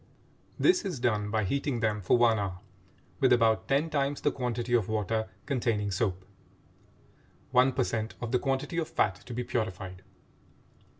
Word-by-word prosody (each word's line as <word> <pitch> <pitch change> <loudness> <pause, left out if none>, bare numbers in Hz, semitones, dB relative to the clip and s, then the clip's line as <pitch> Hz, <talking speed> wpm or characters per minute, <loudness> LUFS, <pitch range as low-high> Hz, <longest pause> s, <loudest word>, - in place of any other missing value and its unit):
This 360 0 +4
is 180 -9 -3
done 105 -4 0
by 110 0 0
heating 140 +4 -1
them 105 -2 0
for 95 - +3
one 115 -2 +4
hour 95 -3 -3 0.6
with 130 -3 +4
about 115 -2 +3
ten 145 +4 +1
times 140 -1 0
the - - +2
quantity 120 -2 -3
of 115 -4 +2
water 110 0 -1 0.2
containing 115 -7 0
soap 95 -1 -1 1.3
(one 125 +1 +5
per 130 0 +1
cent 110 -2 -3
of 120 -1 -4
the 125 - +3
quantity 140 +5 -1
of 160 - -2
fat 95 - +2
to 120 - -6
be 125 - -2
purified). 95 -6 -3
120 Hz, 165 wpm, -29 LUFS, 105-135 Hz, 1.3 s, one